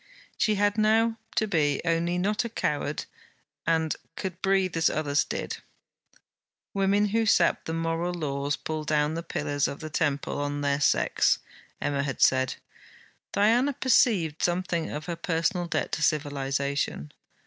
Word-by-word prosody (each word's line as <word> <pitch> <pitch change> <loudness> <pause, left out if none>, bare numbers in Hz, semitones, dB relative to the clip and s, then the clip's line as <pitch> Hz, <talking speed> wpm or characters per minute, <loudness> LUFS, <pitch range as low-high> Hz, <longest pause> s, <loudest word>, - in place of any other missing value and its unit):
She 215 - +2
had 205 +1 +1
now 225 +1 +3 0.2
to 220 - +2
be, 150 -7 +1
only 170 +1 +1
not 205 +5 +1
a 235 - -4
coward, 150 -8 -2 0.6
and 160 -1 +2
she - - -36
could 185 -2 -5
breathe 190 -2 +1
as 165 0 +3
others 150 -1 +1
did. - - -4 1.2
'Women 200 +1 +2
who 225 +2 +1
sap - - +3
the 160 - -3
moral 165 +1 -1
laws 145 -4 -2
pull 155 -1 -4
down 150 0 +1
the 165 - -3
pillars 145 -3 -1
of 140 - -6
the 155 -1 -7
temple 145 -2 -1
on 145 0 -2
their 140 0 +1
sex,' - - +3 0.4
Emma 140 -1 0
had 140 -2 -3
said. 130 0 +3 0.8
Diana 235 +7 +3
perceived 205 - +2
something 175 -2 0
of 150 0 -5
her 170 0 -3
personal 170 +2 -1
debt - - -1
to - - -2
civilization. 140 - -1
165 Hz, 150 wpm, -27 LUFS, 145-195 Hz, 1.2 s, now